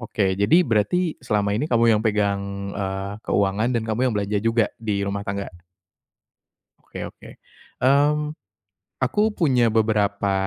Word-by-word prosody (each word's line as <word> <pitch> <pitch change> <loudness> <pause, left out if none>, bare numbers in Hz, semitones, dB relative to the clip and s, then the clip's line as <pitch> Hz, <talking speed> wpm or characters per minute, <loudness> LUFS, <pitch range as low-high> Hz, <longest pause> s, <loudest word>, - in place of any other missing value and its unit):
Oke, 100 -4 -1
jadi, 160 - +5
berarti 150 - +1
selama 105 -1 0
ini 145 +7 -1
kamu 115 -1 +4
yang - - -3
pegang, 100 -1 -1
eee, 95 0 -3
keuangan, 100 +3 +1
dan 115 - 0
kamu 110 +1 -2
yang - - -3
belanja 100 0 -1
juga 115 0 +2
di 105 -3 -1
rumah 100 0 -3
tangga? 100 0 -4 1.3
Oke - - -11
oke. - - -15 0.5
Mmm, 150 +3 +3 0.7
aku 130 +11 +1
punya 125 -8 +3
beberapa 105 -3 +1
105 Hz, 140 wpm, -23 LUFS, 100-120 Hz, 1.3 s, jadi